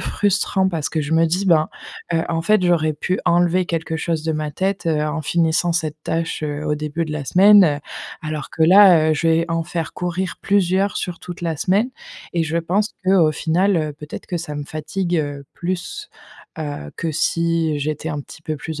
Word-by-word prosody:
frustrant 200 -1 +1
parce 160 -5 -2
que 160 - -1
je 150 +2 -3
me 165 +1 +4
dis: 185 +4 -1
«Ben, 160 -3 +4 0.4
heu, 165 0 +2
en 165 -1 -1
fait 210 0 +3
j'aurais 165 -3 +2
pu 180 +5 -2
enlever 175 +1 +3
quelque 165 -1 -3
chose 160 -1 -2
de 160 - 0
ma 155 -1 -3
tête, 190 +4 -2
heu, 155 -2 +1
en 155 +1 -2
finissant 170 +2 +1
cette 160 -3 -2
tâche, 165 -1 -2
heu, 150 0 -3
au 150 - +1
début 155 +2 -3
de 155 - -5
la 145 -2 -4
semaine», 185 +7 +3 0.2
heu, 145 -3 +1 0.4
alors 155 -1 -5
que 160 - -2
là, 175 -3 +7
heu, - - +3
je 165 +2 0
vais 165 +1 +3
en 165 0 0
faire 165 -1 -4
courir 180 +1 -3
plusieurs 195 0 +2
sur 175 -2 -4
toute 175 -1 -8
la 165 -3 -2
semaine 205 - +1 0.4
et 170 -1 +1
je 160 +1 -2
pense 190 +6 0
qu'au 185 -5 +4
final, 180 +5 +1
heu, 155 -2 -1
peut-être 150 +1 -9
que 175 - -3
ça 150 -3 -6
me 145 - -4
fatigue, 170 +4 -3
heu, 145 -2 -3
plus, 185 - -4 0.5
heu, 145 - -5
que 165 -2 -2
si 165 -1 0
j'étais 155 +2 -3
un 150 -2 -3
petit 155 - -13
peu 155 -2 -3
plus 155 +2 -6
165 Hz, 205 wpm, -20 LUFS, 155-180 Hz, 0.5 s, là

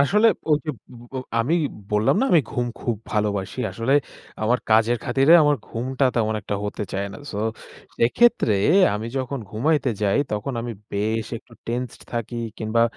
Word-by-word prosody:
আসলে 210 +10 +5 0.2
ওই 150 - +5
যে 155 - -1 0.4
ব - - -13 0.3
আমি 140 +9 +1 0.4
বললাম 105 - +3
না - - +3
আমি 170 - +7
ঘুম 120 0 -1
খুব 120 -3 -1 0.2
ভালোবাসি। 105 0 -1
আসলে 115 +4 -1 0.5
আমার 120 +3 +2
কাজের 115 +2 +4
খাতিরে 135 +5 +4
আমার 145 -1 +4
ঘুমটা 130 +4 -2
তেমন 110 -2 +1
একটা 100 - -4
হতে 105 - -3
চায় 100 +1 -1
না। - - -9
সো 100 - -4 0.7
এক্ষেত্রে 235 - +3 0.4
আমি 110 +2 -3
যখন 130 +1 -3
ঘুমাইতে 135 +3 +1
যাই 100 +6 +2
তখন 105 +6 -2
আমি 120 0 -4 0.2
বেশ 110 +2 -1
একটু 120 - -24
টেন্সড 120 +1 -4
থাকি 120 0 -3 0.2
কিংবা 110 +1 +1
120 Hz, 160 wpm, -23 LUFS, 110-135 Hz, 0.7 s, আমি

